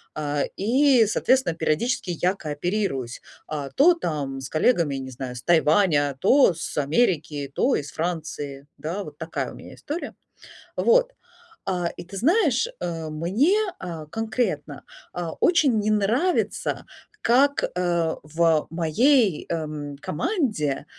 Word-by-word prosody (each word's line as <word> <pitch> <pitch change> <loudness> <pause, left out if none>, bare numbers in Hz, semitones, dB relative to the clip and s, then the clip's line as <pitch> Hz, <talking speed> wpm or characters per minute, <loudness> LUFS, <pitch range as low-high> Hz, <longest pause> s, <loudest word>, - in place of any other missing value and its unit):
А, 145 -1 -1
и, 250 +3 +4
соответственно, 225 -3 +1
периодически 180 +7 -1
я 180 +3 +1
кооперируюсь, 150 - -3 0.3
а, 145 -3 -4
то 320 - +5
там 145 - -3
с 130 - -7
коллегами, 155 - +2
не 130 -1 -6
знаю, 125 0 -6
с - - -7
Тайваня, 155 -4 +3
то 260 -3 +5
с 160 - -6
Америки, 150 - 0
то 265 - +2
из 140 -2 -6
Франции, 150 -4 -4
да, 180 +6 -4
вот - - -11
такая - - -4
у - - -11
меня - - -12
история. 315 +4 -5 0.6
Вот, - - +3 0.5
а, 180 -3 0
и - - -8
ты 195 +3 -10
знаешь, 330 - +2
а, 165 -2 -4
мне, 200 - +2 0.2
а, 165 -4 -6
конкретно, 220 - -3 0.3
а, 170 -2 -4
очень 300 -9 +4
не 215 +1 0
нравится, 225 - 0 0.4
как, 275 +4 +3
э, 170 -2 0
в 160 +1 +1
моей, 185 - +2
эм, 150 -3 -4
команде, 170 - -1
170 Hz, 130 wpm, -24 LUFS, 150-235 Hz, 0.6 s, то